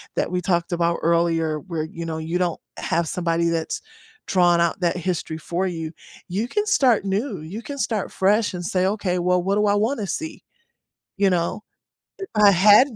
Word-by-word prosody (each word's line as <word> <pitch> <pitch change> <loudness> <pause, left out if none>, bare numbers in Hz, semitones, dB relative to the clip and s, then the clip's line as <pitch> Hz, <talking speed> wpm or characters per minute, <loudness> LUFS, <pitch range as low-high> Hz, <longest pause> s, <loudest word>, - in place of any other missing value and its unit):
that - - -1
we 180 0 0
talked 175 0 0
about 170 0 +1
earlier 165 -2 +1
where, 165 -5 -4
you 165 +1 -7
know, 160 -1 -3
you 165 +3 -2
don't 175 -2 -1 0.2
have 170 -1 0
somebody 170 -1 0
that's 165 -1 -2 0.5
drawn 175 -2 +4
out 170 +2 +1
that 175 +1 +1
history 170 -3 -3
for 175 +4 -2
you. 165 -3 -4 0.4
You 205 +7 -2
can 420 +9 -1
start 255 - +3
new, 200 - -1
you 190 +9 -7
can 280 +3 -7
start 220 -7 -1
fresh 205 +2 +2
and 175 -1 -5
say, 185 +1 +1
"Okay, 190 -3 -1
well, 180 0 +2
what 195 +3 0
do 210 0 +2
I 205 - +3
wanna 215 0 0
see." 320 - -5 0.7
You 200 -1 +3
know, 175 +4 -1 0.6
"If 390 -1 -6
I 205 -1 +7
had 210 +7 +6
180 Hz, 190 wpm, -23 LUFS, 170-205 Hz, 0.7 s, I